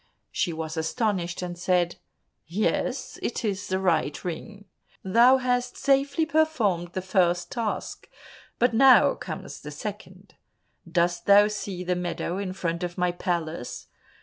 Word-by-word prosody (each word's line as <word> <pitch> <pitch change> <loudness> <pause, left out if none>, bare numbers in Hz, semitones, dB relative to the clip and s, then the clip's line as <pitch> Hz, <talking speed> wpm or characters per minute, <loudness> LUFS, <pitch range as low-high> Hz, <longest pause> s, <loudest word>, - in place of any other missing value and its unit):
She 175 - 0
was 160 0 -5
astonished, 180 0 -1
and 175 -1 -4
said, 175 -1 +1 0.5
"Yes, 215 +8 -1
it 235 - -3
is 200 -1 -2
the 185 - 0
right 165 -6 0
ring. 205 +4 -6 0.4
Thou 235 +7 +6
hast 245 -1 -1
safely 280 +3 +2
performed 235 - +1
the 185 - -3
first 175 -2 +1
task, 230 -4 -4 0.5
but 245 0 +2
now 260 +2 +6
comes - - -7
the - - -9
second. - - -8 0.6
Dost 175 0 0
thou 205 +1 +7
see 200 -3 -5
the 180 0 0
meadow 175 +1 -3
in 195 -2 -3
front 170 -3 -3
of 175 -1 -4
my 180 -1 +1
palace? 170 -6 -4
185 Hz, 140 wpm, -26 LUFS, 175-230 Hz, 0.6 s, thou